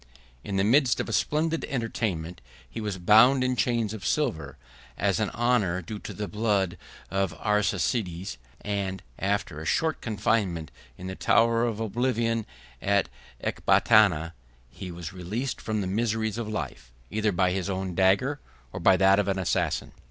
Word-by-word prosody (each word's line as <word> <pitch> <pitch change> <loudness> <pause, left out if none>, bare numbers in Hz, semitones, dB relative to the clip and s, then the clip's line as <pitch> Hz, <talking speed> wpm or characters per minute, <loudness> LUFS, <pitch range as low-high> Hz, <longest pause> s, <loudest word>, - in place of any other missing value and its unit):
In 100 - -4
the 95 - +3
midst 125 +4 +4
of - - -2
a 115 - -4
splendid 160 +5 0
entertainment, 100 - -3 0.3
he 115 - -7
was 105 -3 -3
bound 110 +8 +6
in 130 0 +1
chains 115 -3 0
of 105 -4 -7
silver, 80 - -1 0.4
as - - +1
an - - 0
honor 105 -7 +1
due 105 +5 -6
to - - -8
the 105 -1 -5
blood 105 -4 0 0.4
of 95 0 +1
the 80 - -11
Arsacides; 95 - -1 0.2
and, 100 -2 -3 0.2
after 95 -6 -1
a - - -7
short 160 - 0
confinement 100 - -1 0.3
in 90 - -9
the 95 - -4
Tower 115 +4 +3
of 115 -3 -2
Oblivion 115 0 0 0.3
at 100 0 +2 0.3
Ecbatana, 85 -7 +3 0.4
he 90 - -8
was 85 -2 -7
released 105 +9 -4
from 110 -1 -2
the - - -2
miseries 110 +2 -1
of 110 -2 -4
life, 65 - -5 0.2
either 110 0 +1
by 90 0 +2
his 95 +1 -2
own 95 -1 -3
dagger, 100 +11 +2 0.3
or - - -4
by 95 +2 +5
that 95 +1 +5
of 100 - 0
an 95 -1 0
assassin. 95 -3 -1
105 Hz, 165 wpm, -27 LUFS, 95-115 Hz, 0.4 s, bound